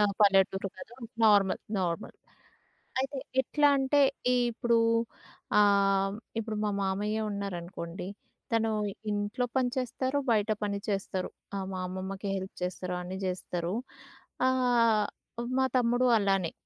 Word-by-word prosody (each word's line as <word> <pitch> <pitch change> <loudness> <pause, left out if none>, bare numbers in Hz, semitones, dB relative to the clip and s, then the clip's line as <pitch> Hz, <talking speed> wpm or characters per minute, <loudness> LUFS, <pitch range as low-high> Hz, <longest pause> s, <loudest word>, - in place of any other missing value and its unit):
ఆ! - - +5 0.2
పల్లెటూరు 195 -1 +4
కాదు. 230 - -11 0.3
నార్మల్. 205 -3 +5 0.2
నార్మల్. 175 +2 -2 0.9
అయితే, 270 +1 -2 0.2
ఎట్లాంటే, 285 0 +3 0.3
ఇ - - +3 0.2
ఇప్పుడూ 235 0 +2 0.8
ఆహ్, 195 -1 +4 0.2
ఇప్పుడు 220 -1 -3
మా 210 - +1
మామయ్యే 210 +3 -1
ఉన్నారనుకోండి, 180 -2 -5 0.4
తను 225 -1 +2 0.4
ఇంట్లో 205 +4 -1
పని 250 -1 +2
చేస్తారు, 260 +2 -1
బయట 215 0 +2
పని 200 -1 -1
చేస్తారు. 195 -2 -2 0.3
ఆహ్, 190 -1 -3
మా 185 - -3
అమ్మమ్మకి 190 +2 -5
హెల్ప్ 190 0 -5
చేస్తారు. 180 0 -3
అన్ని 185 +2 -5
చేస్తారు. 180 0 -3 0.7
ఆహ్, 235 -5 +3 0.5
మా 260 - +4
తమ్ముడు 245 +1 +3
అలానే. 195 -4 +1
205 Hz, 115 wpm, -29 LUFS, 190-235 Hz, 0.9 s, ఆ